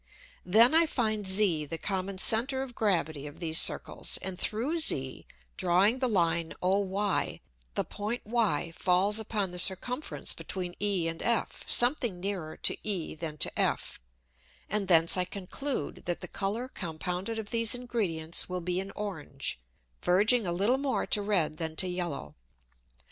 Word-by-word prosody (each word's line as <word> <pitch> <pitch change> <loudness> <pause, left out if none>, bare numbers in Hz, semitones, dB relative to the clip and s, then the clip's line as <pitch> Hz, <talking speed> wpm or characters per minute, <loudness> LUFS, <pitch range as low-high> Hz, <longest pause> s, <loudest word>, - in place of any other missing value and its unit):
Then 225 - +6
I 325 +1 +5
find 215 -7 -1
Z 190 -6 +4
the 165 - -5
common 190 +1 -3
center 255 +7 +4
of 260 -2 -9
gravity 160 -10 -1
of 145 - -12
these 165 -1 +2
Circles, - - +2
and 190 -1 -4
through 260 +10 -1
Z 135 - +1 0.3
drawing 190 +7 +3
the 255 - +1
Line 170 -6 0
OY, 195 +1 0 0.4
the - - 0
Point 215 +4 -5
Y 210 -8 0
falls 190 +4 +2
upon 210 -3 -2
the 180 - -5
circumference 245 - +1
between 180 -2 -5
E 195 -5 +1
and 165 0 -5
F, 235 -1 -1
something 240 -6 +3
nearer 180 -5 -4
to - - +1
E 195 -6 -2
than 155 -1 -6
to - - +1
F, - - -1 0.7
and 205 -2 -1
thence 165 0 +6
I 180 - +2
conclude, 195 - -5
that 175 -1 -1
the - - -6
Colour 205 +6 -3
compounded 180 +1 -4
of 215 -2 -6
these 230 0 +4
Ingredients 190 -12 -2
will 180 0 -3
be 180 +1 -2
an 195 +1 -5
orange, 160 - -5 0.4
verging 210 +4 +3
a - - -1
little 205 +9 +1
more 275 -1 -1
to 210 - +2
red 185 -7 0
than 160 -2 -4
to 185 - 0
yellow. 175 - -4
190 Hz, 160 wpm, -29 LUFS, 170-220 Hz, 0.7 s, Then